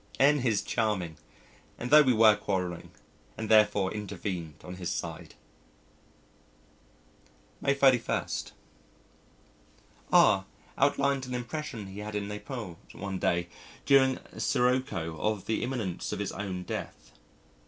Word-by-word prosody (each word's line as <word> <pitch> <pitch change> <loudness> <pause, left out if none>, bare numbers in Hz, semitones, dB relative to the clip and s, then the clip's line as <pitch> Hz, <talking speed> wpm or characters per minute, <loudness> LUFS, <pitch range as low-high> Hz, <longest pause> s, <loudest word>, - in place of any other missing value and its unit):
N 145 +2 +5
is 115 -6 +1
charming, 105 -8 -1 0.6
and 125 - -5
thought 150 -2 +8
we 130 - +5
were 110 -1 +6
quarrelling, 95 -4 -3 0.5
and 110 -1 -4
therefore 105 -3 +4
intervened 95 -6 -5
on 90 0 -8
his 90 -2 -4
side! - - -5 2.3
May 140 - +2
31. 130 -4 +3 1.9
R 95 0 +5 0.3
outlined 140 -1 +1
an 125 - -4
impression 125 -2 -5
he 95 +1 -9
had 105 0 -6
in 100 -1 -2
Naples 105 - -6 0.2
one 100 -2 -5
day 85 0 +1 0.4
during 130 -1 +5 0.2
a - - -10
sirocco 125 -11 0
of 105 -2 -1
the 110 - -1
imminence 115 -9 -3
of - - -2
his - - -3
own 95 -3 -4
death. - - -6
105 Hz, 120 wpm, -29 LUFS, 95-130 Hz, 2.3 s, thought